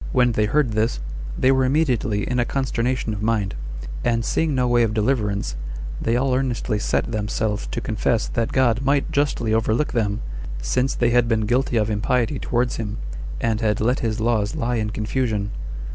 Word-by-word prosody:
When 125 Hz, -2 st, +4 dB
they 105 Hz, -2 st, +1 dB
heard 135 Hz, +2 st, +2 dB
this, 110 Hz, -, 0 dB, 0.4 s
they 130 Hz, -, +4 dB
were 130 Hz, 0 st, +3 dB
immediately 130 Hz, -6 st, +1 dB
in 125 Hz, 0 st, 0 dB
a -, -, +4 dB
consternation 125 Hz, -3 st, -1 dB
of 105 Hz, -, -5 dB
mind; 110 Hz, -3 st, 0 dB, 0.5 s
and 115 Hz, -1 st, +1 dB
seeing 160 Hz, -3 st, +1 dB
no 125 Hz, -1 st, +2 dB
way 120 Hz, 0 st, +4 dB
of 110 Hz, -2 st, +1 dB
deliverance, 105 Hz, -, 0 dB, 0.5 s
they 115 Hz, -, +1 dB
all 130 Hz, +1 st, +2 dB
earnestly 125 Hz, -4 st, 0 dB
set 110 Hz, -, 0 dB
themselves 105 Hz, -1 st, -1 dB
to -, -, -3 dB
confess 110 Hz, +1 st, 0 dB
that 115 Hz, -1 st, -1 dB
God 125 Hz, -3 st, +3 dB
might 140 Hz, +1 st, +1 dB
justly 140 Hz, -6 st, +1 dB
overlook 110 Hz, +6 st, +1 dB
them, 105 Hz, -3 st, 0 dB, 0.4 s
since 125 Hz, -, 0 dB
they 120 Hz, -1 st, +2 dB
had 120 Hz, -1 st, +4 dB
been 110 Hz, -1 st, +2 dB
guilty 120 Hz, +2 st, +1 dB
of 110 Hz, 0 st, +1 dB
impiety 120 Hz, +5 st, 0 dB
towards 120 Hz, 0 st, 0 dB
him, 105 Hz, -2 st, -4 dB, 0.4 s
and 115 Hz, -1 st, 0 dB
had 105 Hz, -2 st, +1 dB
let 125 Hz, +4 st, +2 dB
his 115 Hz, -1 st, -1 dB
laws 110 Hz, -1 st, +1 dB
lie 125 Hz, -5 st, 0 dB
in 110 Hz, -1 st, -1 dB
confusion. 105 Hz, -1 st, -1 dB
115 Hz, 180 wpm, -23 LUFS, 110-125 Hz, 0.5 s, When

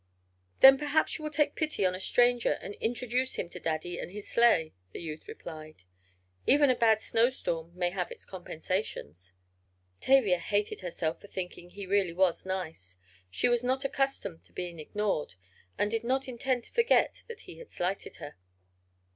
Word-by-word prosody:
"Then 270 Hz, 0 st, +10 dB
perhaps 295 Hz, +2 st, +1 dB
you -, -, -9 dB
will 305 Hz, -, -2 dB
take 295 Hz, -1 st, +1 dB
pity 305 Hz, -11 st, 0 dB
on 180 Hz, -, +2 dB
a 185 Hz, -, -5 dB
stranger, 245 Hz, +4 st, +3 dB
and 200 Hz, -, -7 dB
introduce 245 Hz, +2 st, -1 dB
him 175 Hz, -, -3 dB
to 180 Hz, -, -9 dB
Daddy 165 Hz, +2 st, -3 dB
and -, -, -5 dB
his 205 Hz, +2 st, -9 dB
sleigh," 230 Hz, -10 st, +3 dB, 0.2 s
the -, -, -6 dB
youth 155 Hz, -2 st, -7 dB
replied. 155 Hz, -, -10 dB, 0.6 s
"Even 285 Hz, -1 st, +6 dB
a -, -, +2 dB
bad 225 Hz, -2 st, +3 dB
snowstorm 225 Hz, -9 st, 0 dB
may 175 Hz, -1 st, +1 dB
have 180 Hz, -1 st, -3 dB
its -, -, -11 dB
compensations." 160 Hz, -, -5 dB, 0.7 s
Tavia 225 Hz, -10 st, +4 dB
hated 205 Hz, +4 st, -1 dB
herself 170 Hz, -3 st, -3 dB
for -, -, -12 dB
thinking 180 Hz, -2 st, -6 dB
he 200 Hz, +2 st, -8 dB
really 190 Hz, -2 st, +1 dB
was 185 Hz, 0 st, +1 dB
nice. 160 Hz, -, -5 dB, 0.3 s
She 95 Hz, -, +1 dB
was 240 Hz, 0 st, +2 dB
not 260 Hz, +2 st, 0 dB
accustomed 270 Hz, -, -2 dB
to 85 Hz, -, -23 dB
being 175 Hz, -2 st, -5 dB
ignored, 155 Hz, -, -2 dB, 0.4 s
and 205 Hz, -, +1 dB
did 225 Hz, 0 st, -1 dB
not 265 Hz, +3 st, 0 dB
intend 255 Hz, 0 st, -1 dB
to -, -, -21 dB
forget 470 Hz, 0 st, +3 dB
that 465 Hz, -, -9 dB
he -, -, -12 dB
had 485 Hz, -, -11 dB
slighted 185 Hz, +3 st, -3 dB
her. 145 Hz, -, -9 dB
200 Hz, 170 wpm, -30 LUFS, 170-250 Hz, 0.7 s, Then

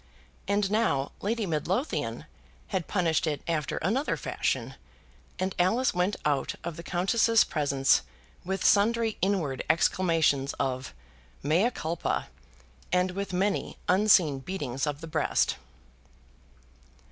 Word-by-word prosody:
And 200 Hz, 0 st, +1 dB
now 210 Hz, -12 st, +1 dB
Lady 220 Hz, +2 st, -1 dB
Midlothian 180 Hz, -, -2 dB, 0.4 s
had 185 Hz, -5 st, -2 dB
punished 165 Hz, -4 st, +1 dB
it 150 Hz, -2 st, -2 dB
after 155 Hz, -4 st, -1 dB
another 245 Hz, -, 0 dB
fashion, -, -, -2 dB, 0.6 s
and 190 Hz, 0 st, -1 dB
Alice 225 Hz, +9 st, +2 dB
went 180 Hz, +3 st, +1 dB
out 145 Hz, -2 st, 0 dB
of 170 Hz, -, -4 dB
the 170 Hz, -, -7 dB
Countess's 215 Hz, +6 st, +3 dB
presence 140 Hz, -3 st, +2 dB, 0.4 s
with 190 Hz, +1 st, -3 dB
sundry 225 Hz, +2 st, +3 dB
inward 175 Hz, -9 st, 0 dB
exclamations 160 Hz, -4 st, +2 dB
of 130 Hz, -, -3 dB, 0.5 s
"mea 170 Hz, -, +3 dB
culpa," 165 Hz, -8 st, -3 dB, 0.6 s
and 180 Hz, 0 st, +2 dB
with 200 Hz, +1 st, -4 dB
many 195 Hz, +2 st, -1 dB
unseen 180 Hz, -7 st, +4 dB
beatings 140 Hz, -4 st, -3 dB
of 145 Hz, 0 st, -3 dB
the 165 Hz, -, -7 dB
breast. 160 Hz, 0 st, +1 dB
180 Hz, 115 wpm, -28 LUFS, 150-200 Hz, 0.6 s, unseen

